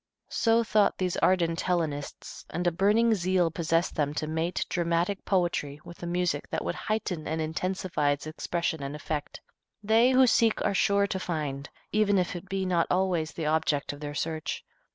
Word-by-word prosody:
So 230 0 +3
thought 215 -2 +2
these 180 -2 -1
ardent 170 -3 +2
Hellenists, 160 -6 -3
and 175 +2 -3
a 175 - +4
burning 210 +6 +3
zeal 180 -3 +1
possessed 165 0 0
them 150 -2 -1
to 155 - -1
mate 160 +3 -1
dramatic 175 +3 0
poetry 170 -6 0
with 170 - -11
a 175 - -4
music 175 -4 -1
that - - -3
would - - -1
heighten 200 -7 -3
and 160 +1 -2
intensify 165 -1 -1
its 145 +1 -1
expression 160 0 -2
and 140 +1 -4
effect. 150 0 -5 0.4
They 225 +4 +5
who 260 0 +6
seek 225 -2 +3
are - - +2
sure 200 0 +3
to 190 -1 -3
find, 150 -5 -3 0.2
even 210 -1 +3
if 180 -1 0
it 180 +2 -8
be 195 -1 -1
not 175 -2 +2
always 180 -4 +1
the 160 - -4
object 150 -2 0
of 145 - -10
their 145 -1 -6
search. 155 0 -3
175 Hz, 180 wpm, -28 LUFS, 155-190 Hz, 0.4 s, who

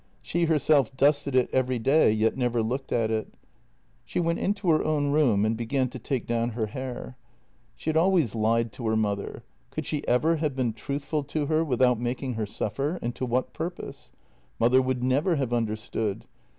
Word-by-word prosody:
She 170 +1 0
herself 150 -5 +2
dusted 140 0 +2
it 130 -1 +4
every 130 -1 +1
day, 135 +2 +4
yet 110 +1 +1
never 120 -3 0
looked 130 +4 -3
at 115 -2 +1
it. 110 -1 -3 0.7
She - - -3
went 170 -1 0
into 200 -3 +1
her 155 - +3
own 145 -2 +1
room 125 -9 +3
and 110 +1 +1
began 125 +3 -1
to 130 0 -8
take 130 +1 -2
down 115 0 0
her 115 -1 -2
hair. 130 +3 -6 0.6
She 160 - -2
had 160 - 0
always 170 - +3
lied 115 +1 +1
to 115 0 -5
her 110 - +2
mother 100 -2 -2
— - - -39
could - - -5
she 150 - -2
ever 155 +7 +3
have 150 -3 -1
been 125 -4 0
truthful 140 +5 -3
to 145 +1 -2
her 155 +2 +2
without 125 -5 +2
making 125 +2 -2
her 110 -2 -3
suffer, 140 - -2
and 120 +1 -2
to 130 - -4
what 125 +2 -1
purpose? 160 -4 -6 0.5
Mother 125 +3 +5
would 130 -1 -1
never 145 +8 +2
have 135 -5 -1
understood. 110 -2 -2
130 Hz, 190 wpm, -26 LUFS, 115-150 Hz, 0.7 s, Mother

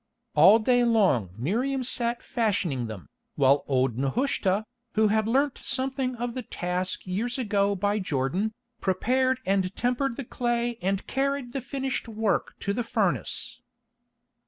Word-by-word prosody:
All 175 +8 +8
day 245 +2 +3
long 195 - +3
Miriam 250 - 0
sat 240 -1 -1
fashioning 190 - 0
them, 105 -5 -8 0.3
while 140 +1 +4
old 130 -3 +1
Nehushta, 200 - 0 0.3
who 215 0 +4
had 220 +1 +2
learnt 270 +3 +1
something 265 -1 -1
of 240 0 -3
the 255 - -3
task 180 -3 -3
years 220 +7 -2
ago 200 -4 +1
by 205 +2 0
Jordan, 180 +5 -1 0.3
prepared 255 +7 +1
and 190 0 +1
tempered 250 +1 0
the 275 - -5
clay 240 -1 -1
and 195 +1 -1
carried 275 -2 -1
the 270 - -2
finished 265 0 -3
work 220 -1 -1
to 200 - -1
the 245 - -1
furnace. 230 - -1
220 Hz, 140 wpm, -27 LUFS, 185-250 Hz, 0.3 s, All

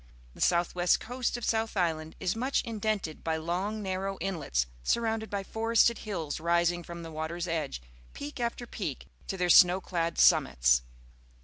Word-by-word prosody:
The - - -12
south 170 0 +2
west 175 0 +3
coast 245 +1 -2
of 240 - -5
South 225 -1 0
Island 160 -3 -1
is 185 - -1
much 255 +4 0
indented 215 -8 -3
by 160 -1 0
long, 185 +7 -2
narrow 195 0 -2
inlets, 165 - -1 0.2
surrounded 225 - 0
by 200 -1 -3
forested 225 +2 +2
hills 165 -10 -4
rising 170 +1 +2
from 170 0 -8
the 165 - -8
water's 160 +3 -4
edge, 155 - -2 0.4
peak 145 - -7
after 240 0 -2
peak, 180 - -5 0.2
to 190 - -3
their 180 -1 +2
snow 180 +2 +7
clad 170 -3 -2
summits. - - +5
180 Hz, 165 wpm, -29 LUFS, 165-215 Hz, 0.4 s, snow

